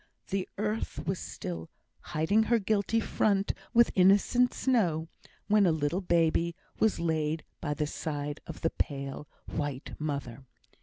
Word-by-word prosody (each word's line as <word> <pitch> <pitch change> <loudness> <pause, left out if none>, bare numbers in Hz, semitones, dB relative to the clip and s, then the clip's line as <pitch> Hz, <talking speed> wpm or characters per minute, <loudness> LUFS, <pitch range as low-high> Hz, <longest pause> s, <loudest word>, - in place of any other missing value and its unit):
The 195 -1 -1
earth 215 +2 -2
was 190 -1 -1
still 80 -2 -6 0.3
"hiding 185 +9 +1
her 235 - +5
guilty 215 +1 +1
front 200 -2 +1 0.2
with 235 -1 +5
innocent 200 +7 +5
snow," 175 -11 +1 0.4
when 210 -2 +5
a - - +4
little 160 +4 0
baby 170 -1 +2 0.2
was 220 -1 +3
laid 160 -1 0 0.2
by 145 - -2
the 150 - 0
side 145 -1 -4
of 165 - -8
the 165 - +1
pale 140 0 -3 0.2
white 145 -2 -4
mother. 140 -4 -4
165 Hz, 140 wpm, -30 LUFS, 150-205 Hz, 0.4 s, her